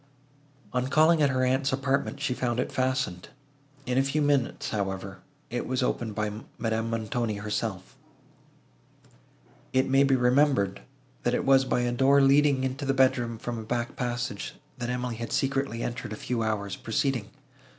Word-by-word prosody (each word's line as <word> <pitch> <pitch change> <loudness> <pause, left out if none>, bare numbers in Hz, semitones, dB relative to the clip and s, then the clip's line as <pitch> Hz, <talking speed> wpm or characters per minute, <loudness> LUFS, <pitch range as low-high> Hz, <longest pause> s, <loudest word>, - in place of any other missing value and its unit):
On 125 0 0
calling 155 +3 +4
at 145 - +4
her 130 -1 +1
aunt's 135 +2 +1
apartment, 135 +1 0
she 140 -2 0
found 120 -1 -1
it - - -1
fastened. 130 -9 -1 0.6
In 125 +1 +1
a - - +4
few 135 +3 0
minutes, 145 -4 +1
however, 95 -2 -3 0.3
it 120 - -2
was 130 0 0
opened 115 -4 -2
by 105 0 -2 0.2
Madame 115 0 -1
Montoni 115 0 -1
herself. 100 -2 -4 1.8
It 130 0 +3
may 135 +1 +4
be 135 -1 +4
remembered, 125 -6 +2 0.4
that 120 0 +1
it - - -1
was 135 -1 +5
by 125 - +1
a 120 0 0
door 135 +3 +4
leading 140 0 +4
into 130 +2 -2
the 135 0 0
bedroom 120 -3 +2
from 120 +1 -4
a - - -4
back 120 +4 -2
passage, 120 -5 -3 0.2
that 120 0 -3
Emily 125 -2 -2
had 115 0 -5
secretly 135 -3 0
entered 120 -2 -4
a - - -4
few 120 +2 -2
hours 100 -3 -1
preceding. 130 -3 -1
125 Hz, 165 wpm, -27 LUFS, 115-135 Hz, 1.8 s, was